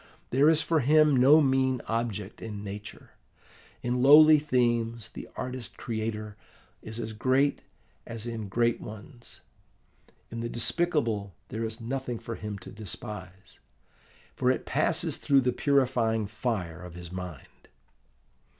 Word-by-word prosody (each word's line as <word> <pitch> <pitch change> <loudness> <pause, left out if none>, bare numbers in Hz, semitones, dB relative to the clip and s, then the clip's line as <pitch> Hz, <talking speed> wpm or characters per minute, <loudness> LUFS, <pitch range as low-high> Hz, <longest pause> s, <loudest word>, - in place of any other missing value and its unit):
There 140 +5 +5
is 160 -1 +3
for 165 -1 +2
him 150 +2 +5
no 140 +5 +7
mean 130 -2 +2
object 110 -3 -3
in 105 -2 -6
nature. 105 +1 -8 0.7
In 125 +1 0
lowly 155 +3 +8
themes 120 -5 0
the - - -9
artist 130 -2 -6
creator 110 -2 -4 0.5
is 110 +1 -8
as 110 -1 -4
great 130 +5 +2 0.5
as 115 -1 -5
in 115 -3 -4
great 120 +3 +1
ones: 115 +4 -9 0.9
in 115 - -5
the 115 0 -3
despicable 120 - 0
there 110 +1 -3
is 110 +1 -6
nothing 125 +1 -3
for 115 - -6
him 105 -2 -5
to - - -9
despise, 95 -2 -8 0.8
for - - +1
it - - 0
passes - - 0
through 140 -1 +3
the 125 -1 +1
purifying 125 -6 +2
fire 100 -6 -3
of 90 -1 -10
his 90 -1 -9
mind. 90 -5 -9
115 Hz, 135 wpm, -28 LUFS, 105-130 Hz, 0.9 s, lowly